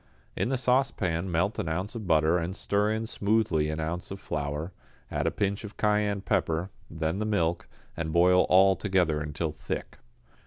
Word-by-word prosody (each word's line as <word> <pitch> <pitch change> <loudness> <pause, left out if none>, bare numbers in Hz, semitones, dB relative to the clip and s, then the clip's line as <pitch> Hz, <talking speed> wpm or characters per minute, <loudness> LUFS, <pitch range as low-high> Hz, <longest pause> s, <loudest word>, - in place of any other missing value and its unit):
In - - 0
the 135 - +1
saucepan 110 -9 +1
melt 90 +6 0
an 80 - -2
ounce 90 +6 -3
of 110 -5 -6
butter 80 +1 +3
and 85 +3 -3
stir 100 0 0
in 110 +1 -1
smoothly 100 -8 +1
an 80 0 -3
ounce 80 +3 -3
of 95 - -6
flour, 75 +2 -3 0.4
add - - -1
a - - +5
pinch 100 +1 -1
of 105 -1 -9
cayenne 105 -1 +1
pepper, 90 -3 0 0.2
then 80 +3 -2
the - - 0
milk, 85 -5 0 0.3
and 80 -1 -3
boil 90 +2 +5
all 95 +1 +6
together 90 -7 +1
until 75 +2 -3
thick. 75 - -6
90 Hz, 180 wpm, -28 LUFS, 80-105 Hz, 0.4 s, all